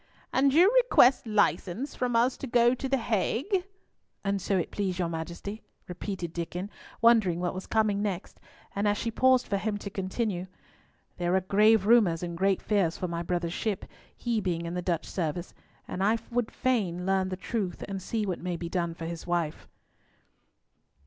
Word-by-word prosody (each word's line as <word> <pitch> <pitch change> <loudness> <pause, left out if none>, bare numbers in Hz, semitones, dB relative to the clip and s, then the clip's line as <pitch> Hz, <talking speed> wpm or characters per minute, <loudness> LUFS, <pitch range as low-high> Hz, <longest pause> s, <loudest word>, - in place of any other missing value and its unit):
"And 275 +1 +4
you 355 - +6
request 255 - +5
license 210 - +1
from 245 -1 -1
us 240 +3 +3
to 275 - -6
go 240 0 +4
to 260 +1 -4
the 270 - +3
Hague?" 250 - 0 0.6
"An 200 0 0
it - - -6
so 190 -2 +1
please 190 -3 -2
your 175 -2 0
Majesty," 170 +6 -5 0.3
repeated 180 -1 -5
Diccon, 175 +4 -4 0.3
wondering 220 -7 +4
what 175 0 -1
was 185 - -6
coming 215 -2 +1
next; 195 -3 -4 0.4
and 200 +1 +1
as 205 0 +2
she 230 - -2
paused 255 +2 +4
for 200 - 0
him 210 +1 -2
to 200 -1 -7
continue—"There 185 -2 -4
are 190 - +3
grave 210 +2 +4
rumours 205 -7 +4
and 170 -1 -4
great 190 +2 +1
fears 195 -6 +1
for 180 - -2
my 170 0 -3
brother's 175 -1 -2
ship—he 220 +2 -3
being 170 -3 -2
in 170 - -4
the 180 - -2
Dutch 170 -2 -1
service—and 175 +2 -5
I 215 +3 +3
would 240 -1 0
fain 195 -9 -1
learn 190 0 +1
the 185 - -4
truth 195 -2 -3
and 195 -1 -4
see 215 +3 -2
what 185 -3 -2
may 180 -1 -3
be 170 0 -5
done 170 -2 -1
for 165 - -6
his 170 0 -6
wife." 170 -3 -2
195 Hz, 175 wpm, -28 LUFS, 175-225 Hz, 0.6 s, you